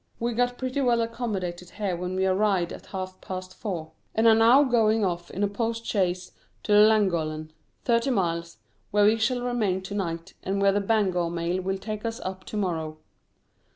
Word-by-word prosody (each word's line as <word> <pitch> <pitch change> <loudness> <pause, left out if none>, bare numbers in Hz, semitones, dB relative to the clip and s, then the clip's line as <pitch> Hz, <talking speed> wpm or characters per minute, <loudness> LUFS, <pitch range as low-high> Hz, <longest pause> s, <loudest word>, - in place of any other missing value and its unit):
We 235 +1 -1
got 245 +1 0
pretty 260 +2 -2
well 240 -3 +3
accommodated 200 -7 -3
here 200 -4 -1
when 180 +1 -4
we 190 0 +1
arrived 190 -2 +1
at - - -11
half 185 -1 -6
past 185 0 -6
four, 170 -8 -5 0.2
and 220 +1 +4
are 225 - +8
now 230 +5 +6
going 225 -4 +3
off 175 -1 -3
in 195 - -3
a - - +3
postchaise 205 -4 -1 0.3
to - - -3
Llangollen 175 -8 +3 0.3
thirty 235 +2 +2
miles 170 -7 -1 0.3
where 205 0 +4
we 215 +2 +5
shall 245 +2 0
remain 215 -7 0
to 195 - -6
night, 170 -2 -3
and 195 +1 -2
where 200 0 +4
the 205 +1 +1
Bangor 195 -5 +1
mail 170 +2 -1
will 190 +1 -2
take 215 +1 -5
us 230 0 -3
up 190 0 -6
to 215 - -5
morrow. 160 -6 -2
200 Hz, 185 wpm, -26 LUFS, 180-225 Hz, 0.3 s, are